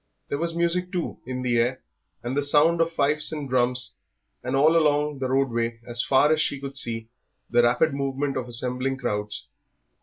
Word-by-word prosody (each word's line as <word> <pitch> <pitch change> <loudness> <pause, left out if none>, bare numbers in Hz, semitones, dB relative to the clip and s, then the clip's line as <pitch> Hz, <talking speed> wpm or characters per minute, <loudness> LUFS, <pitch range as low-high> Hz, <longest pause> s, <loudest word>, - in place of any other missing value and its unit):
There 140 - -2
was 165 0 -2
music, 175 +1 0
too, 175 -2 -3
in 130 0 -4
the 120 -1 +1
air, 125 +2 0 0.4
the 130 +4 -1
sound 150 +4 +4
of 165 0 +1
fifes 150 -1 +1
and 150 -3 -4
drums, 125 -1 +1 0.5
and 130 +1 -2
all 155 +4 +4
along 150 -2 +2
the 130 - -1
roadway 120 -3 0
as 120 -1 0
far 140 +4 +3
as 155 - +1
she 140 - -1
could 140 0 -7
see 115 -3 -2 0.4
the 120 0 +5
rapid 125 +6 +2
movement 140 0 -2
of 130 -1 -3
assembling 125 +2 -1
crowds. 105 -3 -3
135 Hz, 180 wpm, -25 LUFS, 125-150 Hz, 0.5 s, the